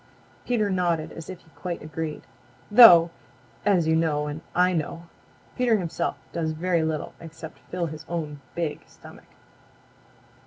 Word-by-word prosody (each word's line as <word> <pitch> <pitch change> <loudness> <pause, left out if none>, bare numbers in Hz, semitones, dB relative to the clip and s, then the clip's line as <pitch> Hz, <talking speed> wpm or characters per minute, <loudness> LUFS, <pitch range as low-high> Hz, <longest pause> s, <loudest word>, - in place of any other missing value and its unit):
Peter 230 -4 +1
nodded 175 -4 0
as 165 - -9
if 185 - -8
he - - -24
quite 175 -4 -5
agreed. 155 0 -5 0.5
Though, 175 -8 +9 0.5
as 190 -5 +3
you 160 - +3
know 155 -2 +1
and 150 +1 -5
I 180 +1 +4
know, 165 +1 -3 0.5
Peter 240 -3 +3
himself 175 -5 -2 0.2
does 160 -2 -1
very 170 +1 0
little 160 -1 -3
except 160 -1 -10
fill 180 -1 -2
his 155 -1 -7
own 150 -4 -4
big 165 -3 -3
stomach. - - -16
165 Hz, 145 wpm, -25 LUFS, 155-180 Hz, 0.5 s, Though